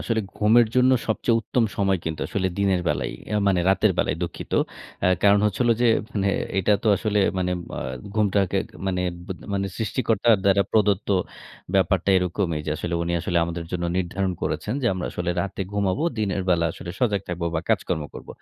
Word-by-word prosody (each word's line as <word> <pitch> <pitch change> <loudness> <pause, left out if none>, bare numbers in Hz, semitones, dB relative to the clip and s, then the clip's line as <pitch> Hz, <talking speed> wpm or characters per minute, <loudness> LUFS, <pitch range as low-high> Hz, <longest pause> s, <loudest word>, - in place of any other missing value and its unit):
আসলে 115 -1 0 0.2
ঘুমের 110 +2 +5
জন্য 125 0 +5 0.2
সবচেয়ে 115 +1 +1
উত্তম 115 +1 0
সময় 95 -2 +2
কিন্তু 80 -1 -3
আসলে 95 -2 -1
দিনের 95 -2 +2
বেলাই, 75 - -1 0.2
এ - - +1
মানে 90 -2 +2
রাতের 95 - +3
বেলাই, - - +1
দুঃখিত। 85 - -6 0.5
অ্যা 90 - +4
কারণ 100 0 +6
হচ্ছে 105 +2 0
হলো 120 -1 +4
যে, 120 - +5 0.2
মানে 100 -1 0 0.3
এটা 95 +2 +3
তো 110 - +1
আসলে 105 -1 0 0.2
মানে 90 0 0 0.3
আ - - -3 0.3
ঘুমটাকে 100 -3 +2 0.3
মানে 90 -1 0 0.2
ব্য 95 - -3 0.2
মানে 100 0 0
সৃষ্টিকর্তার 115 0 +2
দ্বারা 100 0 +4
প্রদত্ত 105 -3 +2 0.7
ব্যাপারটা 95 0 +2
এরকমই। 90 -3 0
যে, - - -1
আসলে 85 +2 -3
উনি 85 - -2
আসলে 85 +1 -2
আমাদের 85 0 -4
জন্য 90 -1 -2
নির্ধারণ 95 +1 -1
করেছেন 110 - -2
যে, - - +1
আমরা 90 - -3
আসলে 90 0 -2
রাতে 100 +1 -3
ঘুমাবো। 100 +5 0 0.2
দিনের 100 -3 0
বেলা 85 -1 +3
আসলে 85 - -8
সজাগ 105 -6 +1
থাকব 90 -1 -4
বা 80 - +1
কাজকর্ম 90 -7 0
করব। - - -10
95 Hz, 180 wpm, -24 LUFS, 90-105 Hz, 0.7 s, কারণ